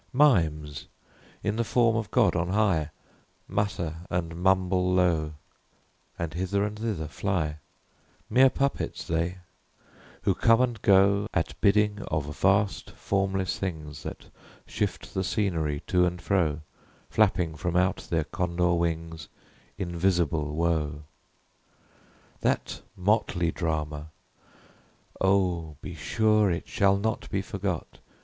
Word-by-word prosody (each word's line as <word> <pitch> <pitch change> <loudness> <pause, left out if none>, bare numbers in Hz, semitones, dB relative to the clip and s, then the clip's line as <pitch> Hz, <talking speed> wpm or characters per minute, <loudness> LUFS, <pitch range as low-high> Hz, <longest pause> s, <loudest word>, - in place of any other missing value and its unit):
Mimes, 80 - +2 0.6
in 105 +1 -1
the 115 - +2
form 115 +1 +3
of 110 -4 -2
God - - +3
on 85 0 0
high, 95 -7 +2 0.6
Mutter 85 -6 -2
and 85 -1 -2
mumble 90 0 +2
low, 85 -4 +2 0.8
And 85 -1 -3
hither 95 +3 0
and 105 0 -3
thither 105 -9 -2
fly; 80 0 -2 0.7
Mere 130 +1 +6
puppets 140 +1 -2
they, 85 +2 -1 0.9
who - - +3
come 115 0 +4
and 120 -4 0
go 100 +1 +4
At 80 -1 0
bidding 105 0 +3
of 75 -1 -2
vast 100 +6 +2
formless 95 -1 -1
things 75 -6 -5
That - - -7 0.4
shift - - -3
the 95 - 0
scenery 80 -7 -1
to 90 -1 +3
and 90 0 -4
fro, 85 -5 0 0.5
Flapping 95 -6 +2
from 85 +3 -3
out 90 +2 +3
their 80 -2 +1
condor 90 +1 0
wings 80 -2 -2 0.5
Invisible 85 -5 0
Wo! 80 -3 0 1.4
That - - -1 0.2
motley 90 -3 +1
drama! 75 -3 -3 1.1
oh, 90 -5 +1
be - - -6
sure 105 +6 +2
It 85 -2 -2
shall 100 0 +3
not 110 +2 -2
be 95 0 -1
forgot! 95 -3 -4
90 Hz, 120 wpm, -27 LUFS, 80-100 Hz, 1.4 s, Mere